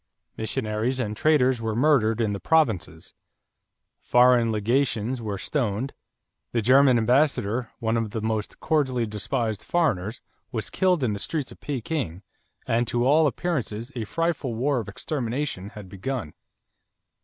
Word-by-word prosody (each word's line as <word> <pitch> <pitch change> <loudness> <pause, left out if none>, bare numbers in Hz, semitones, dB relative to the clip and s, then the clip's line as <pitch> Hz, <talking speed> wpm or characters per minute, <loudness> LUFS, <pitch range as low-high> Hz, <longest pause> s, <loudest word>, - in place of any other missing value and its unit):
Missionaries 110 +2 -2
and 105 -3 -2
traders 130 -4 +3
were 110 -1 -2
murdered 120 -4 +3
in 105 -2 +1
the 100 - -4
provinces; 110 - 0 0.9
foreign 125 -2 +4
legations 120 +2 0
were 105 -3 -3
stoned; 120 +1 -1 0.6
the 115 - +2
German 130 +1 +6
ambassador, 120 -1 +2
one 115 0 0
of 115 -2 0
the 110 - -3
most 110 -1 -3
cordially 130 -6 +1
despised 110 0 -2
foreigners, 120 - 0 0.3
was 110 -3 -4
killed 180 -6 +2
in 110 -4 +1
the 100 - -4
streets 145 +4 -3
of - - -13
Peking; 130 - -3 0.4
and 115 +1 +1
to 120 0 0
all 150 +3 +5
appearances 130 -7 -3
a 120 - -2
frightful 155 -3 -1
war 130 +3 +1
of 110 - -5
extermination 120 -3 -3
had 105 -2 -10
begun. 100 - -4
120 Hz, 140 wpm, -25 LUFS, 110-135 Hz, 0.9 s, German